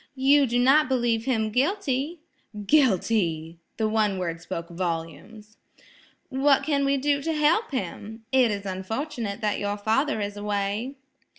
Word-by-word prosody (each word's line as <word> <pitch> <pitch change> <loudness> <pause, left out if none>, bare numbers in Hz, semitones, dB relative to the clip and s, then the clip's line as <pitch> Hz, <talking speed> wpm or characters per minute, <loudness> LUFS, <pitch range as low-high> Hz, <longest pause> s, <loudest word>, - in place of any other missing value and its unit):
"You 275 +1 +4
do 240 +1 0
not 265 +3 +4
believe 235 -3 +1
him 220 -5 0
guilty?" 290 - -1 0.4
"Guilty!" 185 - +1 0.2
the 220 - +1
one 215 -2 +1
word 170 -2 -4
spoke 170 0 -5
volumes. 180 +5 -5 0.7
"What 270 +1 +3
can 280 -2 +1
we 275 0 +2
do 285 +1 +1
to 325 - -2
help 315 +9 +2
him? 220 - -6
It 260 -3 +4
is 200 -1 -3
unfortunate 220 +4 -4
that 210 -1 0
your 205 0 -2
father 220 +6 0
is 205 0 -3
away." 205 +5 -2
225 Hz, 140 wpm, -25 LUFS, 200-275 Hz, 0.7 s, You